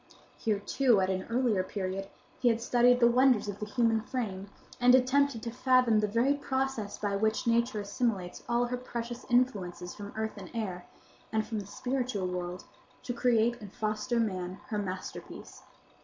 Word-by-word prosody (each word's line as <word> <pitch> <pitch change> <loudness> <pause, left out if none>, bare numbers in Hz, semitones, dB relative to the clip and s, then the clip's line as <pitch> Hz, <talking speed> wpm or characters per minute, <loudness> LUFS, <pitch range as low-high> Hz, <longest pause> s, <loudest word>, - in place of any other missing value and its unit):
Here, 215 -2 0
too, 230 +2 +2
at 190 0 +1
an 185 0 -3
earlier 230 -5 +2
period, 190 0 -4 0.3
he 250 - +2
had 230 -1 +3
studied 245 +1 +4
the 235 - +6
wonders 250 -2 +4
of 205 -1 -5
the 210 - -4
human 225 -1 +2
frame, 205 -5 -4 0.3
and 250 +1 +7
attempted 260 -1 +2
to 230 - -3
fathom 255 -2 +3
the 210 - +1
very 235 +7 +2
process 265 -6 -2
by 205 -1 -1
which 220 +2 0
Nature 235 -1 +2
assimilates 200 -3 -2
all 240 +1 +2
her 250 +1 -2
precious 240 -1 -6
influences 200 -8 0
from 205 -1 -8
earth 220 0 -3
and - - -8
air, 185 -6 -4 0.4
and 220 -1 0
from 220 -2 -3
the 200 - -7
spiritual 250 -4 -2
world, 180 0 -4 0.4
to 245 - -3
create 240 -1 +2
and 205 -3 -9
foster 215 +3 -1
man, 185 -4 -2
her 210 - -1
masterpiece. 185 -2 -7
225 Hz, 170 wpm, -30 LUFS, 200-245 Hz, 0.4 s, and